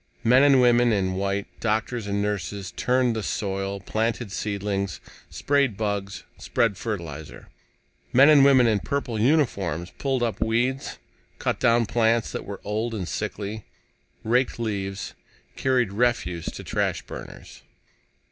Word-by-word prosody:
Men 125 Hz, +3 st, +5 dB
and 140 Hz, -2 st, +6 dB
women 120 Hz, -1 st, +4 dB
in 95 Hz, -3 st, +1 dB
white, 100 Hz, +1 st, -1 dB
doctors 110 Hz, 0 st, -1 dB
and 100 Hz, 0 st, -1 dB
nurses, 100 Hz, -2 st, -3 dB
turned 125 Hz, -2 st, +1 dB
the 110 Hz, -, -2 dB
soil, 100 Hz, -1 st, -3 dB
planted 110 Hz, +2 st, -2 dB
seedlings, 100 Hz, -2 st, -2 dB, 0.3 s
sprayed 140 Hz, -7 st, +1 dB
bugs, 100 Hz, -2 st, -3 dB, 0.2 s
spread 115 Hz, -4 st, +1 dB
fertilizer. 80 Hz, -, -6 dB, 0.6 s
Men 135 Hz, +3 st, +7 dB
and 150 Hz, -3 st, +7 dB
women 135 Hz, -3 st, +6 dB
in 110 Hz, -3 st, +2 dB
purple 135 Hz, -5 st, -3 dB
uniforms 100 Hz, -, +1 dB
pulled 135 Hz, -3 st, 0 dB
up 115 Hz, -2 st, -2 dB
weeds, 120 Hz, +4 st, 0 dB, 0.4 s
cut -, -, -1 dB
down 115 Hz, 0 st, +3 dB
plants 115 Hz, +1 st, +1 dB
that -, -, -5 dB
were 100 Hz, 0 st, -7 dB
old 110 Hz, +3 st, -2 dB
and 95 Hz, -5 st, -4 dB
sickly, 105 Hz, +1 st, -4 dB, 0.6 s
raked 125 Hz, +3 st, +1 dB
leaves, 100 Hz, -4 st, -3 dB, 0.4 s
carried 125 Hz, -6 st, +1 dB
refuse 100 Hz, -7 st, 0 dB
to -, -, -6 dB
trash -, -, -1 dB
burners. -, -, -10 dB
110 Hz, 135 wpm, -25 LUFS, 100-120 Hz, 0.6 s, Men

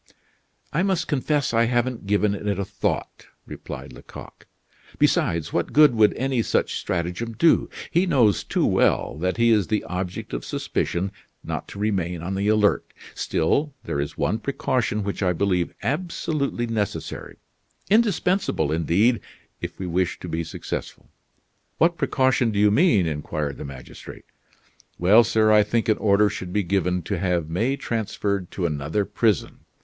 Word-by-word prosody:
"I 160 Hz, -, +2 dB
must 190 Hz, -2 st, 0 dB
confess 145 Hz, -1 st, 0 dB
I 115 Hz, +1 st, +4 dB
haven't 120 Hz, -2 st, -1 dB
given 105 Hz, 0 st, +2 dB
it 100 Hz, +1 st, -5 dB
a 100 Hz, -, -2 dB
thought," -, -, -3 dB, 0.2 s
replied 65 Hz, 0 st, -8 dB
Lecoq. -, -, -12 dB, 0.5 s
"Besides, 85 Hz, -2 st, +1 dB
what -, -, -1 dB
good 150 Hz, -3 st, +7 dB
would 110 Hz, -2 st, +4 dB
any 130 Hz, -2 st, 0 dB
such -, -, 0 dB
stratagem 90 Hz, +6 st, -3 dB
do? 165 Hz, +9 st, +3 dB, 0.2 s
He 175 Hz, +3 st, +2 dB
knows 120 Hz, -, +3 dB
too -, -, 0 dB
well -, -, +2 dB
that 90 Hz, +4 st, -1 dB
he 115 Hz, 0 st, +4 dB
is 105 Hz, -6 st, +3 dB
the 110 Hz, -, 0 dB
object 90 Hz, +1 st, -5 dB
of -, -, -3 dB
suspicion 95 Hz, +3 st, -2 dB, 0.3 s
not -, -, -4 dB
to -, -, -10 dB
remain 90 Hz, -5 st, -1 dB
on 95 Hz, +3 st, -3 dB
the 100 Hz, +1 st, -1 dB
alert. 105 Hz, -1 st, +3 dB, 0.3 s
Still, 140 Hz, -, 0 dB
there 70 Hz, -, -3 dB
is 70 Hz, 0 st, -4 dB
one 110 Hz, -, 0 dB
precaution 125 Hz, -5 st, -1 dB
which 100 Hz, +1 st, -4 dB
I 90 Hz, -2 st, +2 dB
believe 90 Hz, -1 st, 0 dB
absolutely 150 Hz, -, -2 dB
necessary, 110 Hz, -3 st, -4 dB, 0.5 s
indispensable 195 Hz, -, +2 dB
indeed, 90 Hz, +9 st, +2 dB, 0.4 s
if -, -, -6 dB
we 95 Hz, -, -5 dB
wish 90 Hz, 0 st, -1 dB
to -, -, -6 dB
be 80 Hz, 0 st, -2 dB
successful." 80 Hz, -, -6 dB, 0.7 s
"What 170 Hz, +2 st, +3 dB
precaution 130 Hz, -3 st, +2 dB
do 105 Hz, -, -3 dB
you 105 Hz, 0 st, +4 dB
mean?" 110 Hz, -, +4 dB
inquired 75 Hz, -2 st, -3 dB
the -, -, -7 dB
magistrate. 65 Hz, -3 st, -10 dB, 0.7 s
"Well, 105 Hz, +7 st, +6 dB
sir, 110 Hz, -1 st, +3 dB
I 105 Hz, 0 st, +7 dB
think 115 Hz, +3 st, 0 dB
an 110 Hz, -, +3 dB
order 105 Hz, 0 st, +4 dB
should 95 Hz, -3 st, -5 dB
be 105 Hz, +1 st, +1 dB
given 90 Hz, -1 st, 0 dB
to 95 Hz, +2 st, -3 dB
have 90 Hz, -3 st, -1 dB
May 115 Hz, +11 st, +1 dB
transferred 100 Hz, -6 st, -2 dB
to 90 Hz, -, -3 dB
another 80 Hz, +5 st, -1 dB
prison. 110 Hz, -3 st, 0 dB
105 Hz, 155 wpm, -24 LUFS, 90-120 Hz, 0.7 s, good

